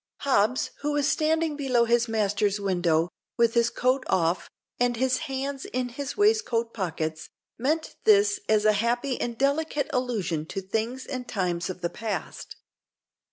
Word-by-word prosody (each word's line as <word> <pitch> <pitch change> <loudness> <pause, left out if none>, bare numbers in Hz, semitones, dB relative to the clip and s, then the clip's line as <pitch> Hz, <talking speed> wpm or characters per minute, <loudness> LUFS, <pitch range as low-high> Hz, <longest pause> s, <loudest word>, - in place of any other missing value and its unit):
Hobbs, 255 -2 +2
who 295 +1 -1
was 290 -1 +1
standing 315 0 +1
below 255 -5 +2
his 235 +1 +2
master's 205 -2 +1
window, 175 -4 +1 0.3
with 235 -1 +3
his 235 0 +3
coat 255 +3 +1
off, 170 0 +1 0.3
and 245 -1 +2
his 255 +1 +1
hands 270 +1 -3
in 250 0 -2
his 270 +2 -5
waistcoat 410 - +2
pockets, 160 -5 -3 0.3
meant 310 +6 -1
this 410 -2 +5
as 215 -1 +3
a 215 - +6
happy 240 +5 0
and 235 -1 -3
delicate 285 +1 0
allusion 205 - -1
to 195 - -4
things 225 +7 -3
and 255 -2 -5
times 180 -2 -1
of 185 -1 -6
the 170 - -1
past. 215 +1 -5
235 Hz, 155 wpm, -26 LUFS, 200-275 Hz, 0.3 s, a